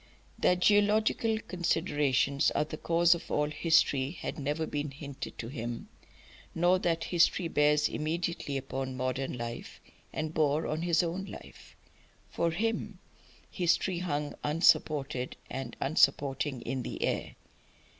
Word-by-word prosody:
That 180 0 +3
geographical 215 +2 +3
considerations 145 -6 +1
are - - +3
the 155 - -6
cause 170 +2 +4
of 170 - -7
all 150 0 0
history 150 -5 +3
had 160 -1 -6
never 145 +3 -1
been 145 -1 -3
hinted 140 0 -8
to 115 - -5
him, 120 -2 -5 0.7
nor 175 +2 +3
that 165 -2 0
history 175 0 +2
bears 150 -1 +3
immediately 160 -2 -2
upon 130 -1 -4
modern 130 0 -2
life 120 0 -6 0.3
and 155 0 -3
bore 155 0 +2
on 155 +1 -2
his 170 0 +2
own 175 +3 -3
life. - - -12 0.6
For 170 - +1
him 215 +2 -2 0.5
history 175 0 +1
hung 150 -4 -2
unsupported 145 -4 +2 0.2
and 130 -3 -5
unsupporting 140 -2 +1
in 130 +1 -3
the - - -4
air. - - -2
150 Hz, 130 wpm, -30 LUFS, 135-170 Hz, 0.7 s, cause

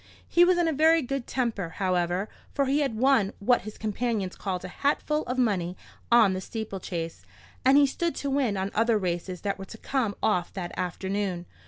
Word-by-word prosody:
He 345 - +5
was 360 0 +4
in 345 -1 +2
a 320 - +1
very 320 +2 +4
good 270 0 -3
temper, 220 -10 -2
however, 180 0 0 0.3
for 280 - +2
he 275 +2 +2
had 270 -7 0
won 245 -5 +3
what 245 +5 +3
his 215 +1 -9
companions 215 -3 -2
called 185 -3 -4
a - - -11
hatful 300 +1 +1
of 250 - -3
money 185 -7 0 0.3
on 225 -5 +6
the 185 - -3
steeple 220 -1 -5
chase, 165 -2 -5 0.4
and 265 +2 +6
he 290 - +7
stood 335 +5 -1
to 280 - -3
win 260 -7 +1
on 190 +1 -2
other 225 0 +3
races 180 -1 -3
that 200 -1 -2
were 195 - -6
to 225 - -11
come 230 -5 -1
off 180 -5 +1
that 175 -3 -5
afternoon. 185 0 -2
215 Hz, 200 wpm, -27 LUFS, 190-270 Hz, 0.4 s, he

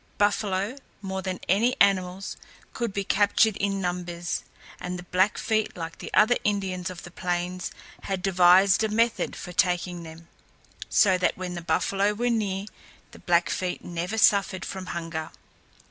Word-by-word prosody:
Buffalo, 205 +2 0 0.3
more 190 0 -3
than 185 -1 -4
any 225 +7 +3
other - - -7
animals, 190 -1 0 0.4
could 235 -3 -2
be 200 0 -2
captured 205 +2 +3
in 200 -1 -1
numbers, 175 -1 -3 0.4
and 180 0 -4
the 180 - -8
Blackfeet, 205 +4 0
like 165 -1 -6
the - - -7
other 220 +3 +5
Indians 190 -4 -1
of 180 -2 -9
the 175 - -10
plains, 180 +1 -3 0.3
had 190 -2 -3
devised 190 +2 +5
a 220 - +1
method 230 +2 +1
for 180 - -8
taking 180 0 +1
them, 165 0 -11 0.6
so 190 -4 +4
that 180 - +1
when 180 -1 -5
the 175 - -5
buffalo 200 +4 +1
were 240 +3 0
near 200 -4 -1 0.5
the - - -14
Blackfeet 175 +1 0
never 175 +5 -3
suffered 195 -3 +3
from 190 -1 -6
hunger. 165 -2 -4
185 Hz, 155 wpm, -26 LUFS, 180-205 Hz, 0.6 s, other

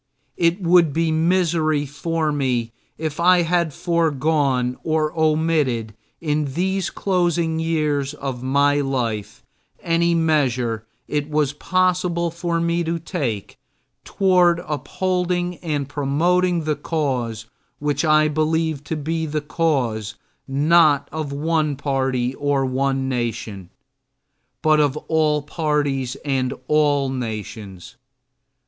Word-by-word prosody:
It 170 +2 +2
would 170 -3 +4
be 165 +1 +1
misery 160 -2 +1
for 155 +2 -2
me 125 -5 -1 0.3
if 155 -1 -4
I 175 0 +5
had 170 -1 +1
foregone 145 -6 +1
or 155 -1 0
omitted 155 -8 +1 0.3
in 150 -3 -1
these 190 +1 0
closing 175 -4 0
years 150 -3 0
of 135 -4 -5
my 140 +2 +2
life 120 -7 -3 0.4
any 170 0 +2
measure 130 -9 0 0.2
it 150 0 -2
was 150 -2 +1
possible 180 0 0
for 170 0 -2
me 170 +1 0
to 165 +1 -1
take 145 - -4 0.4
toward 180 -3 +3
upholding 180 +4 -1
and 150 -5 -3
promoting 170 +5 +1
the 155 -1 0
cause 130 -8 -2 0.3
which 145 0 -1
I 155 -1 +4
believe 155 -1 0
to 160 - -3
be 160 +2 -2
the 150 0 -1
cause 125 -10 -1 0.3
not 150 +1 +4
of 155 -2 -4
one 155 0 0
party 135 -3 -1
or 140 -1 0
one 135 +1 0
nation 115 -7 -3 0.9
but 155 -1 +4
of 145 -1 +2
all 150 -2 +1
parties 145 -5 -1
and 130 -3 0
all 145 -3 +2
nations. 110 -5 -6
150 Hz, 115 wpm, -21 LUFS, 135-165 Hz, 0.9 s, I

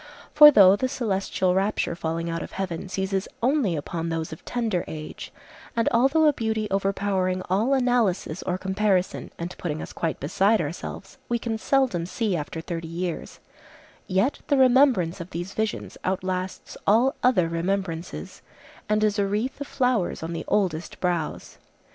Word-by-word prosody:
For 300 0 +11
though 195 -8 +7
the 260 +6 -1
celestial 195 -6 0
rapture 195 -1 0
falling 165 0 -3
out 165 0 -3
of - - -8
heaven 185 -1 -4
seizes 190 0 -2 0.2
only 255 - +2
upon 165 +3 -3
those 165 -1 -3
of 160 - -11
tender 225 -7 -1
age, 155 -1 -7 0.4
and 230 -1 +1
although 270 +7 +4
a 300 - +5
beauty 220 -3 -1
overpowering 195 -1 0
all 225 +9 +3
analysis 235 - +1
or 180 - -2
comparison 190 -1 0
and 170 +2 -5
putting 155 -3 -3
us - - -7
quite 165 -2 -2
beside 195 +10 +2
ourselves 170 +4 -6
we 240 - +1
can 230 -1 -3
seldom 245 -11 +1
see 210 -1 -1
after 160 +1 -4
thirty 165 -1 -5
years, 170 +1 -5 0.7
yet 195 +9 +1
the 285 - +3
remembrance 250 - +4
of 170 - -8
these 175 +3 -5
visions 220 -1 -3
outlasts 185 0 -3
all 235 +7 +4
other 245 -10 +3
remembrances, 170 - -3 0.5
and 215 0 +2
is 210 -1 +2
a 200 - +2
wreath 220 +8 -2
of 285 - -4
flowers 250 - 0
on 165 +1 -4
the 165 - -5
oldest 180 -5 -1
brows. 175 -4 -2
190 Hz, 160 wpm, -25 LUFS, 170-225 Hz, 0.7 s, For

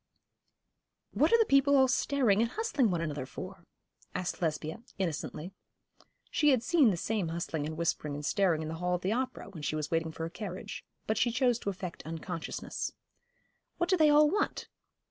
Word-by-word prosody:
'What - - +3
are 465 - +7
the 450 - +4
people 275 -1 +5
all 265 -1 +6
staring 250 -5 +2
and 230 - +2
hustling 300 - +1
one 175 -3 0
another 145 -5 -3
for?' - - -9 0.5
asked 180 0 -3
Lesbia, 160 +3 -2 0.2
innocently. 175 -1 -3 0.8
She 300 - +3
had 255 -4 +3
seen 305 -5 +5
the 185 - 0
same 205 0 -1
hustling 165 -2 -3
and 155 0 -5
whispering 155 -3 -1
and 145 0 -5
staring 170 -3 +2
in - - -4
the 160 - -4
hall 180 0 +1
at 180 - -4
the 190 - +1
opera, 250 -2 -2
when 165 -5 -9
she 145 +1 -1
was 155 -1 -3
waiting 165 -1 0
for 160 - -6
her 165 - -2
carriage; 190 -3 -6 0.2
but 220 -1 0
she 240 - +3
chose 245 -1 +2
to 200 - -3
affect 180 -2 -6
unconsciousness. 165 +1 -4 0.8
'What 345 +1 0
do - - +6
they 310 -4 +5
all 300 +1 +7
want?' 405 +7 -1
190 Hz, 190 wpm, -31 LUFS, 165-260 Hz, 0.8 s, are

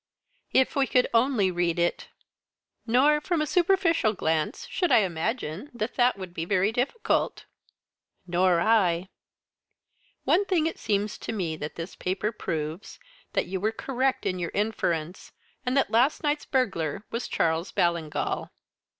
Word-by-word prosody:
"If 260 0 +3
we 275 -1 +2
could 250 - +3
only 230 -5 +3
read 175 -1 0
it!" 175 0 0 0.8
"Nor, 285 +6 +4
from 345 +1 0
a 305 - +1
superficial 345 - +2
glance, 160 -3 -1
should 355 - -1
I 225 - +7
imagine 190 - -3
that 230 0 -3
that 245 -3 +3
would 185 -2 -8
be 165 - -3
very 195 +3 +2
difficult." 265 - -1 0.8
"Nor 180 0 +3
I." 185 -4 +2 1.1
"One 400 - +3
thing 350 -5 +1
it 325 - -2
seems 205 0 -1
to - - -5
me 180 -7 -2
that 150 0 -6
this 165 +2 -6
paper 190 +4 -2
proves 160 -4 -5 0.4
that - - +1
you 190 +1 -3
were 215 +4 0
correct 260 +3 -1
in 185 -1 -1
your 170 -1 -2
inference, 175 -5 -2 0.3
and 255 +2 +1
that 270 - +2
last 245 +8 +3
night's 295 0 0
burglar 195 - -1
was 230 - -3
Charles 165 +2 0
Ballingall." 170 -3 -1
210 Hz, 150 wpm, -27 LUFS, 175-260 Hz, 1.1 s, I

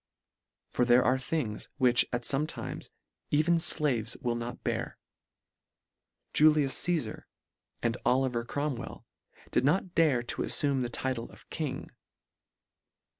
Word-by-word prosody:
For - - +1
there 120 +1 +5
are 130 +1 +3
things, 130 -6 -3
which, 125 -3 +4
at 120 0 -2
fome 140 +5 +2
times, - - -7 0.4
even 155 +3 +3
ilaves 135 -9 +1
will 120 -1 -1
not 120 +1 -6
bear. - - -3 1.4
Julius 150 -3 +4
Ca?sar 155 -11 -2 0.6
and 115 -1 +1
Oli 130 +1 +2
ver 120 -1 -2
Cromwell 140 +1 -4 0.5
did - - +2
not 175 +5 +1
dare 145 -8 +3
to 120 - -3
alfume 140 -3 +2
the 120 - -2
title 125 -1 -3
of - - -18
King. 150 -5 -4
130 Hz, 125 wpm, -29 LUFS, 120-150 Hz, 1.4 s, there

